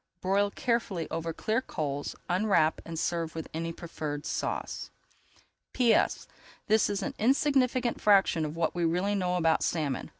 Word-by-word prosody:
Broil 200 +3 +2
carefully 200 -8 -1
over 165 0 -2
clear 220 +8 -1
coals, 145 - -4
unwrap 180 -4 +2
and 165 -1 -6
serve 165 -1 -2
with 160 - -5
any 165 +1 -3
preferred 155 -3 -5
sauce. - - -3 0.8
P.S. 240 -3 +2 0.4
This 215 0 +3
is 200 -1 -2
an - - -3
insignificant 255 -1 +2
fraction 195 -5 +4
of 155 0 -4
what 165 -1 0
we 175 - -1
really 180 +5 +1
know 180 -3 0
about 165 -2 +2
salmon. 150 -6 -1
175 Hz, 145 wpm, -29 LUFS, 160-215 Hz, 0.8 s, fraction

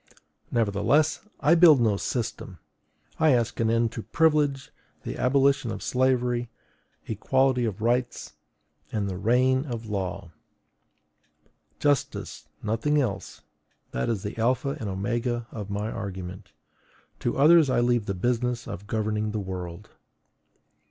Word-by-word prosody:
Nevertheless, 115 +7 +2 0.2
I 150 - +5
build 165 -5 +7
no 110 -4 +3
system. 115 +3 -4 0.6
I 155 -3 +5
ask 120 -2 0
an 115 -1 +2
end 115 0 +2
to 115 - -5
privilege, 150 -2 +1 0.3
the - - -5
abolition 135 -1 +2
of - - -5
slavery, 125 -2 +1 0.6
equality 130 +3 +1
of 110 -1 -4
rights, 120 +1 -1 0.6
and 105 -2 -1
the 90 -2 -4
reign 130 +4 +3
of 115 -3 -5
law. 100 -3 -4 1.5
Justice, 145 -1 -1 0.2
nothing 115 +8 +1
else; 115 -8 -3 0.5
that 60 - -2
is 110 -5 -2
the 105 - -5
alpha 130 +5 +1
and 110 -5 -4
omega 120 +5 -2
of 105 -3 -6
my 105 +2 -3
argument: 95 -2 -7 0.7
to - - -2
others 155 +1 +6
I 130 - +2
leave 120 -3 +1
the 100 - -2
business 120 +3 -1
of 100 +3 -7
governing 110 -1 -1
the 110 - -1
world. 95 0 -7
115 Hz, 130 wpm, -26 LUFS, 105-130 Hz, 1.5 s, build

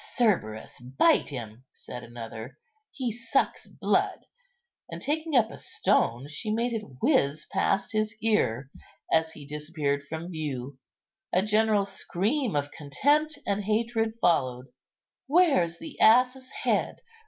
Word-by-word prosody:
"Cerberus, 170 - 0
bite 130 - +3
him!" 120 -3 -7
said 125 0 -9
another, 120 +2 -8 0.3
"he 255 -4 -3
sucks 235 +4 -1
blood;" - - 0 0.6
and - - -6
taking 315 +1 -1
up 225 -3 +4
a - - -9
stone, 120 +4 +1
she 155 +9 -5
made 235 +2 0
it 225 - -1 0.2
whiz 140 +2 +2
past 195 - +1
his 215 0 -1
ear 140 - +1 0.4
as 160 0 +3
he 145 - -11
disappeared 150 -1 -2
from 160 +4 -6
view. 140 -5 -5 0.5
A 185 - +3
general 215 -1 +3
scream 210 - -1
of 145 0 -1
contempt 290 - +1
and 205 0 0
hatred 225 +1 0
followed. 130 - +1 0.6
"Where's 270 - +3
the 315 - -10
ass's 250 +3 +5
head? - - -1
190 Hz, 130 wpm, -27 LUFS, 140-235 Hz, 0.6 s, ass's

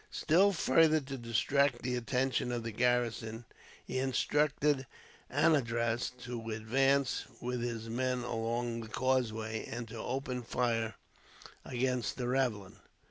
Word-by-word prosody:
Still 190 +6 +4
further 155 -2 +4
to 135 -1 -6
distract 120 +2 +1
the 125 0 0
attention 125 +1 0
of 120 -1 -2
the 115 - -3
garrison, 120 -1 0 0.4
he 130 - -2
instructed 145 +1 +1 0.4
Anandraz 120 -6 +2
to 120 -2 -5
advance 135 +5 +1
with 125 0 -3
his 115 -2 -3
men 125 +1 -1
along 115 0 -2
the 110 - -8
causeway, 110 -2 0
and 120 0 -5
to 115 - -7
open 130 0 -3
fire 115 -2 -1 0.7
against 125 -1 -1
the 125 -2 -2
ravelin. 115 -6 -1
125 Hz, 125 wpm, -32 LUFS, 115-130 Hz, 0.7 s, Still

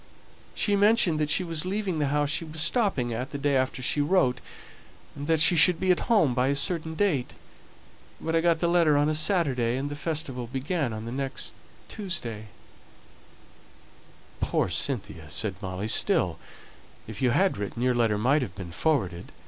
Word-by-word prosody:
She 205 - +1
mentioned 200 -6 +3
that 150 -1 0
she 155 +5 +2
was 165 -3 0
leaving 190 -3 -2
the 145 - +1
house 145 +1 0
she 160 - 0
was 160 0 -7
stopping 160 - 0
at 125 +3 -4
the 140 - -5
day 140 0 0
after 130 0 -1
she 145 - +1
wrote, 145 -6 +1 0.7
and 145 0 -7
that 160 -1 +2
she 170 +3 +5
should 170 +1 +5
be 185 -1 +2
at 180 - +2
home 200 - +3
by 125 +1 +1
a 140 - +1
certain 160 +2 -1
date; 160 -10 0 0.8
but 165 0 -2
I 165 - +3
got 165 -1 +1
the 170 - +2
letter 170 -4 +3
on 145 +1 +2
a - - 0
Saturday, 145 - +2
and 140 +2 -4
the - - -4
festival 145 -5 -3
began 135 +3 -2 0.2
the 115 - -6
next 135 +1 -3 0.3
Tuesday 120 - -5 1.4
" - - -27
"Poor - - 0
Cynthia!" 80 - -1
said 100 +6 -1
Molly. 95 +1 -4
"Still, - - +2 0.7
if 110 -1 -8
you 130 - +3
had 185 - +1
written, 105 +4 -4
your 125 0 +2
letter 115 -3 +1
might 135 +8 +2
have 100 -9 -5
been 95 -3 -8
forwarded. 95 - -1
145 Hz, 180 wpm, -26 LUFS, 120-165 Hz, 1.4 s, she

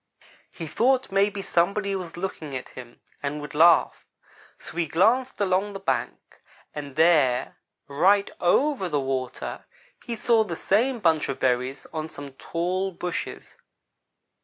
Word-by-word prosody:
"He 165 - -7
thought 250 - +1
maybe 195 0 +1
somebody 195 +4 +1
was 175 -3 -6
looking 160 -7 -4
at 130 - -9
him 120 -2 -12 0.2
and 145 +1 -3
would 145 -1 -8
laugh, 165 +3 +4 0.5
so - - -12
he 170 -2 0
glanced 230 - +2
along 200 +1 +1
the 195 - -6
bank. 195 - -3 0.3
And 145 -2 -7
there, 150 -6 +3 0.3
right 190 +8 +3
over 225 +2 +2
the 150 -3 0
water, 130 -2 -4 0.4
he 235 -3 -4
saw 225 0 +3
the 175 -6 -5
same 240 +10 +1
bunch 160 -5 +2
of 135 - -3
berries 130 +1 0
on 155 0 -4
some 145 -2 -9
tall 180 +6 -2
bushes. 180 -1 -5
175 Hz, 140 wpm, -25 LUFS, 145-200 Hz, 0.5 s, laugh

